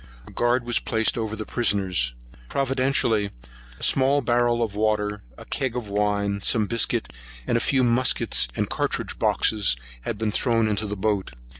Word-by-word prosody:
A -, -, -13 dB
guard 120 Hz, +1 st, +1 dB
was 120 Hz, 0 st, +3 dB
placed 110 Hz, -1 st, 0 dB
over 110 Hz, -2 st, -3 dB
the 110 Hz, 0 st, -6 dB
prisoners. 95 Hz, -, 0 dB, 0.3 s
Providentially 130 Hz, -6 st, +1 dB, 0.5 s
a -, -, -8 dB
small 135 Hz, +2 st, +4 dB
barrel 120 Hz, -1 st, +1 dB
of 110 Hz, -3 st, -3 dB
water, 105 Hz, -1 st, -1 dB, 0.2 s
a -, -, -11 dB
cag 130 Hz, -3 st, -2 dB
of 120 Hz, -4 st, -4 dB
wine, 100 Hz, 0 st, 0 dB
some 110 Hz, +1 st, +2 dB
biscuit, 100 Hz, -, 0 dB, 0.3 s
and -, -, 0 dB
a 115 Hz, -, +2 dB
few 135 Hz, -2 st, +2 dB
muskets 120 Hz, -, +3 dB
and -, -, -1 dB
cartouch -, -, -3 dB
boxes, 105 Hz, -, +2 dB, 0.3 s
had -, -, -4 dB
been 110 Hz, -1 st, -1 dB
thrown 115 Hz, -1 st, +1 dB
into 105 Hz, 0 st, -1 dB
the 105 Hz, 0 st, -5 dB
boat. 100 Hz, -6 st, -1 dB
110 Hz, 165 wpm, -24 LUFS, 105-120 Hz, 0.5 s, small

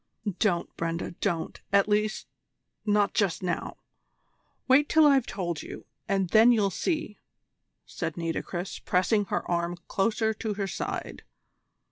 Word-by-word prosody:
"Don't, 175 Hz, -5 st, 0 dB
Brenda, 165 Hz, 0 st, -2 dB
don't 170 Hz, -5 st, -2 dB
at 200 Hz, 0 st, +4 dB
least 210 Hz, +1 st, 0 dB, 0.6 s
not 205 Hz, -1 st, +3 dB
just 195 Hz, -3 st, 0 dB
now! 180 Hz, -2 st, -3 dB, 0.9 s
Wait 275 Hz, +3 st, +5 dB
till 315 Hz, -1 st, +6 dB
I've 275 Hz, -4 st, +4 dB
told 175 Hz, -5 st, -3 dB
you, -, -, -9 dB, 0.2 s
and 195 Hz, -3 st, +1 dB
then 225 Hz, +2 st, +7 dB
you'll 210 Hz, -4 st, +2 dB
see," 310 Hz, -, -2 dB, 0.7 s
said 165 Hz, -3 st, -5 dB
Nitocris, 170 Hz, +2 st, -3 dB
pressing 195 Hz, +3 st, +1 dB
her -, -, -2 dB
arm 170 Hz, 0 st, -1 dB
closer 220 Hz, +2 st, +1 dB
to 215 Hz, 0 st, -4 dB
her 200 Hz, -1 st, -2 dB
side. 180 Hz, -, -4 dB
200 Hz, 130 wpm, -27 LUFS, 175-220 Hz, 0.9 s, then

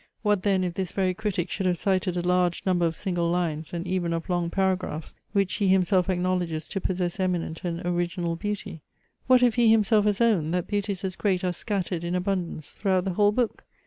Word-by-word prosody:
What 210 Hz, -3 st, +2 dB
then 190 Hz, -1 st, +2 dB
if 180 Hz, -2 st, -2 dB
this 185 Hz, -1 st, -3 dB
very 185 Hz, -2 st, +1 dB
critic 190 Hz, -3 st, -2 dB
should 195 Hz, -2 st, -1 dB
have 180 Hz, -1 st, +1 dB
cited 185 Hz, -2 st, 0 dB
a 175 Hz, 0 st, -1 dB
large 180 Hz, -1 st, +2 dB
number 175 Hz, -3 st, +2 dB
of 165 Hz, -, -3 dB
single 175 Hz, -4 st, -1 dB
lines 165 Hz, -3 st, -1 dB
and 170 Hz, 0 st, -4 dB
even 180 Hz, -2 st, -1 dB
of 165 Hz, +1 st, -4 dB
long 175 Hz, -1 st, 0 dB
paragraphs, 185 Hz, -5 st, -1 dB, 0.2 s
which 195 Hz, -2 st, +1 dB
he 205 Hz, -2 st, +1 dB
himself 185 Hz, 0 st, +3 dB
acknowledges 180 Hz, -3 st, -1 dB
to 195 Hz, -, -3 dB
possess 180 Hz, -1 st, -2 dB
eminent 175 Hz, -3 st, -1 dB
and 175 Hz, -1 st, -3 dB
original 175 Hz, -1 st, -1 dB
beauty? 200 Hz, -2 st, -5 dB, 0.5 s
What 255 Hz, -1 st, +6 dB
if 240 Hz, -2 st, +4 dB
he 235 Hz, -1 st, +4 dB
himself 215 Hz, -1 st, +4 dB
has 210 Hz, -1 st, +1 dB
owned, 185 Hz, -9 st, +2 dB
that 180 Hz, -, 0 dB
beauties 200 Hz, -2 st, -2 dB
as 185 Hz, -2 st, -2 dB
great 190 Hz, -3 st, 0 dB
are 180 Hz, -1 st, 0 dB
scattered 185 Hz, -3 st, -2 dB
in 175 Hz, +1 st, -2 dB
abundance 180 Hz, -5 st, -2 dB
throughout 190 Hz, -2 st, 0 dB
the 190 Hz, -, -1 dB
whole 205 Hz, +2 st, +4 dB
book? 235 Hz, +1 st, -1 dB
185 Hz, 210 wpm, -26 LUFS, 175-200 Hz, 0.5 s, What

